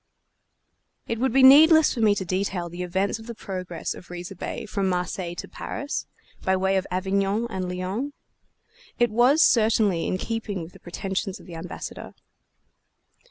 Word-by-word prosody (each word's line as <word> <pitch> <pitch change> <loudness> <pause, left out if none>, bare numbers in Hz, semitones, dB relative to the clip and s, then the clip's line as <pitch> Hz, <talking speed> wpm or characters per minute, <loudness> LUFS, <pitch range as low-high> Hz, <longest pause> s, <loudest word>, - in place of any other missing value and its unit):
It 230 - -2
would 260 0 +1
be 265 +2 +4
needless 315 +4 +8
for - - -5
me 215 -2 +4
to 190 - -3
detail 185 -1 -2
the 175 +2 -7
events 190 +4 -1
of 225 - -12
the 235 - -6
progress 185 -5 -5
of - - -13
Riza 175 +2 -7
Bey 185 - -5
from 200 -2 -1
Marseilles 180 -1 -2
to - - -12
Paris, 285 +2 -5 0.4
by 190 - +2
way 190 +1 +1
of 190 - -2
Avignon 195 +4 0
and 185 -2 -3
Lyons. 185 +10 -3 0.9
It 240 -2 +2
was 250 +8 +5
certainly 215 -6 +3
in 185 - 0
keeping 210 -3 -3
with 160 - -11
the - - -15
pretensions 190 +2 -4
of - - -15
the 175 - -10
Ambassador. 165 +2 -7
195 Hz, 165 wpm, -25 LUFS, 180-225 Hz, 0.9 s, needless